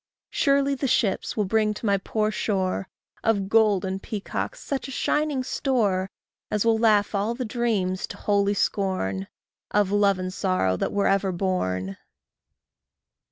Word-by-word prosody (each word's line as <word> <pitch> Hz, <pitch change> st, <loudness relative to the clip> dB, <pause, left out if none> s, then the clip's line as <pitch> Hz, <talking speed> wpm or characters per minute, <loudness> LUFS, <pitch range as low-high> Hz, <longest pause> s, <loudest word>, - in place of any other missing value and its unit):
Surely 280 Hz, 0 st, +2 dB
thy 275 Hz, 0 st, -1 dB
ships 230 Hz, -6 st, 0 dB
will 210 Hz, -, +2 dB
bring 215 Hz, +1 st, +1 dB
to 225 Hz, -, -7 dB
my 200 Hz, -1 st, +3 dB
poor 215 Hz, +2 st, -1 dB
shore, 195 Hz, -3 st, -1 dB, 0.3 s
Of 200 Hz, -4 st, +1 dB
gold 210 Hz, -4 st, +4 dB
and 190 Hz, +1 st, -3 dB
peacocks 215 Hz, -, -4 dB
such 275 Hz, -1 st, -4 dB
a 270 Hz, -, -5 dB
shining 300 Hz, -3 st, 0 dB
store 210 Hz, -9 st, 0 dB, 0.4 s
As 210 Hz, +1 st, 0 dB
will 225 Hz, -1 st, +3 dB
laugh 215 Hz, -3 st, +3 dB
all 210 Hz, +3 st, 0 dB
the 250 Hz, 0 st, -3 dB
dreams 215 Hz, -6 st, -1 dB
to -, -, -8 dB
holy 200 Hz, 0 st, +1 dB
scorn, 100 Hz, -, -1 dB, 0.4 s
Of 205 Hz, -2 st, +2 dB
love 200 Hz, -1 st, +3 dB
and 185 Hz, 0 st, -4 dB
sorrow 185 Hz, -, +1 dB
that -, -, -2 dB
were 200 Hz, 0 st, +1 dB
ever 195 Hz, -1 st, +2 dB
born. 95 Hz, -, -2 dB
205 Hz, 155 wpm, -25 LUFS, 190-225 Hz, 0.4 s, gold